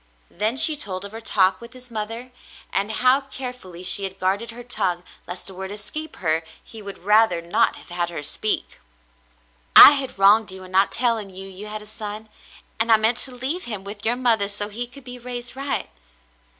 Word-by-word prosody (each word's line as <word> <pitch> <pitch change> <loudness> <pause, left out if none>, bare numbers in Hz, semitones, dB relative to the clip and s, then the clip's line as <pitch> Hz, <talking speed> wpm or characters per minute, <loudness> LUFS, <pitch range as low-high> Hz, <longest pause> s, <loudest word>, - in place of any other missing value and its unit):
Then 215 +7 -2
she 310 +2 +6
told 195 -9 -3
of 200 - -9
her 225 +1 -9
talk 190 -3 +2
with 235 -1 -12
his 250 -1 -12
mother 225 +3 -5 0.4
and 200 +2 0
how 255 +4 +3
care 265 -2 -6
fully 185 -7 -11
she 185 +2 +6
had 190 0 -5
guarded 195 +5 -1
her 240 +1 -7
tongue 180 -7 -1 0.2
lest 180 +1 -6
a 195 - -2
word 190 +1 -7
escape 310 +10 -6
her 160 -1 -1 0.2
he 225 - -11
would 200 -2 -10
rather 210 -4 +4
not 170 +1 +1
have - - -10
had 175 0 -2
her 165 -4 -7
speak. 215 +8 -2 1.0
"I - - +13
had 275 -5 -2
wronged 205 +2 +4
you 190 0 -7
in 185 - -12
not 190 +1 +3
telling 230 -4 0
you 190 +1 -8
you 195 +2 -9
had 215 0 -6
a - - -14
son, 215 0 -7 0.5
and 225 +1 +1
I 220 - +7
meant 225 +3 0
to 265 - -2
leave 260 +8 -4
him 210 -5 -6
with 205 +2 -9
your 230 +2 +1
mother 230 -5 +3
so 205 +1 -2
he 235 +4 -5
could 275 +3 -14
be 250 0 -8
raised 245 0 -6
right." 275 - -2
215 Hz, 210 wpm, -22 LUFS, 195-245 Hz, 1.0 s, I